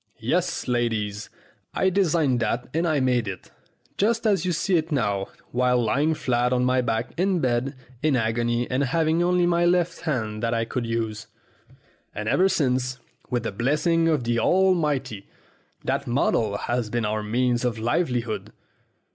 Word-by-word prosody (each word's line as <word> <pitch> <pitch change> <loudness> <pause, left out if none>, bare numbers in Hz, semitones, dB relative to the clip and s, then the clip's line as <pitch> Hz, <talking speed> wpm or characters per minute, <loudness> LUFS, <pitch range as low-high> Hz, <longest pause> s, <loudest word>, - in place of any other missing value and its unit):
Yes, 165 +10 -1
ladies, 110 -4 -1 0.5
I 190 - +2
designed 165 -9 +2
that 115 +2 -1
and 165 +2 +1
I 155 -3 +2
made 125 -4 +1
it, 95 -2 -7 0.5
just 230 +3 +1
as 200 -6 +2
you 180 - +1
see 175 +3 +1
it 160 0 0
now, 100 -8 0 0.2
while 125 0 +2
lying 140 +8 +1
flat 125 -4 0
on 125 0 +2
my 130 0 +2
back 115 0 -2
in 185 0 +1
bed 130 +1 0 0.3
in 155 -2 +2
agony 120 +1 0
and 130 +2 +1
having 160 +4 +1
only 180 0 +3
my 175 0 +2
left 175 -1 +2
hand 110 -9 -2
that 115 0 0
I 115 0 0
could 120 0 -3
use. 115 -1 -3 0.9
And 105 0 -4
ever 190 +11 +3
since, 130 -7 0 0.3
with 120 -2 -1
the - - -2
blessing 150 - +1
of 155 -6 +1
the 120 0 0
Almighty, 150 - +1 0.6
that - - -1
model 115 -4 +1
has 120 -1 -2
been 120 0 -1
our 110 0 -1
means 120 +3 0
of 120 -2 -1
livelihood. 120 -1 -1
125 Hz, 165 wpm, -24 LUFS, 115-160 Hz, 0.9 s, only